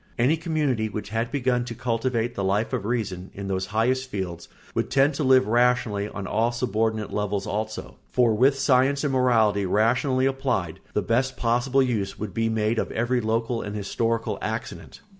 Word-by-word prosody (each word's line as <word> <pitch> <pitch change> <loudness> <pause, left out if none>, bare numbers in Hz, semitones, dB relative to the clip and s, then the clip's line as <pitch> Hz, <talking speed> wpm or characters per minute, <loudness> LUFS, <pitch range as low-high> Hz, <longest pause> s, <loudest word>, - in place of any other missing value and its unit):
Any 125 +7 +3
community 150 -9 -1
which 105 -1 -6
had 115 +2 -2
begun 130 -3 +1
to 120 -1 -6
cultivate 120 0 -1
the 100 - -3
Life 100 +6 0
of 115 -6 -2
Reason 100 -6 -2
in 100 0 -6
those 95 -1 -2
highest 130 +4 0
fields 90 -6 -5 0.3
would - - -1
tend 140 +2 +3
to 145 - -2
live 130 -1 +5
rationally 120 -3 +2
on 100 - -6
all 110 +5 +1
subordinate 110 -3 -1
levels 105 -1 -1
also; 110 +1 -4
for 120 -3 +3
with 135 +5 +3
science 135 +1 +3
and 140 -2 0
morality 110 -6 +3
rationally 125 +6 +2
applied 130 -11 -1
the - - 0
best 130 +3 0
possible 125 +3 +2
use 110 -6 -2
would 105 -3 -5
be 115 +2 0
made 110 0 0
of - - -2
every 120 +2 0
local 115 +1 -1
and 105 +1 -5
historical 115 +3 -1
accident. 110 +3 -5
115 Hz, 180 wpm, -25 LUFS, 105-130 Hz, 0.3 s, live